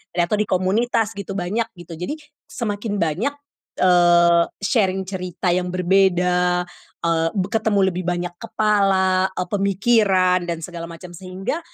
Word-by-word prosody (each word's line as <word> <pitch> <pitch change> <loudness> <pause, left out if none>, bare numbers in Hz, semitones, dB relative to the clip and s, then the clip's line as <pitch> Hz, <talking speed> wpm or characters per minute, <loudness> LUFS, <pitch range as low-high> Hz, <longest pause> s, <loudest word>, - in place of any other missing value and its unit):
atau 175 +3 +1
di 210 - 0
komunitas 210 +4 +1
gitu 200 -1 -6
banyak 210 +6 -1
gitu, 175 -1 -10
jadi 175 - -5 0.4
semakin 205 -2 -3
banyak 175 - 0 0.5
eee, 175 -1 +5 0.2
sharing 195 -2 +1
cerita 185 -1 -4
yang 180 0 -1
berbeda, 180 -1 +2 0.4
eee, 165 -1 +1
be 190 -1 0
ketemu 220 -2 +1
lebih 180 +1 -4
banyak 175 0 -2
kepala, 195 -4 +2
eee, 180 -1 -4
pemikiran 195 -2 +2
dan 170 -1 -3
segala 170 0 -6
macam 170 +2 -10
sehingga, 190 - -4
185 Hz, 135 wpm, -21 LUFS, 175-200 Hz, 0.5 s, eee